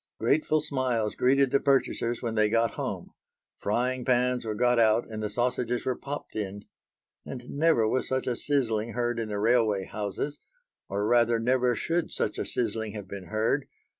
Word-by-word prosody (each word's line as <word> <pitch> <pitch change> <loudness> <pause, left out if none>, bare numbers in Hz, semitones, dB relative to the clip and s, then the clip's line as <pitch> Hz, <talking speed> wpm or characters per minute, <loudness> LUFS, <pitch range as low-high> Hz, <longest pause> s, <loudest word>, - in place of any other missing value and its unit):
Grateful 155 0 +2
smiles 130 -7 0
greeted 135 +1 +3
the 140 - +4
purchasers 125 -4 +1
when 115 -2 -1
they 110 -1 +3
got 115 0 +2
home. - - -5 0.5
Frying 125 +4 0
pans 125 0 +2
were 110 -1 -2
got 120 +2 +3
out 110 +1 +3
and 110 -1 -6
the 105 - -2
sausages 120 +1 -1
were 130 - 0
popped 145 +3 -7
in, 100 -1 -4 0.6
and 125 -2 -8
never 145 -7 +3
was 130 - +1
such 130 0 0
a 125 - 0
sizzling 115 -5 0
heard 120 -1 -1
in 110 -1 -3
the 105 - -2
railway 110 -3 +2
houses 105 +9 -4 0.5
or 100 +1 -1
rather 120 0 +4
never 125 +1 +2
should 170 +7 -1
such - - -2
a - - -2
sizzling 110 -2 -2
have 105 -3 -7
been 100 -1 -7
heard. 110 +8 0
120 Hz, 175 wpm, -28 LUFS, 110-130 Hz, 0.6 s, the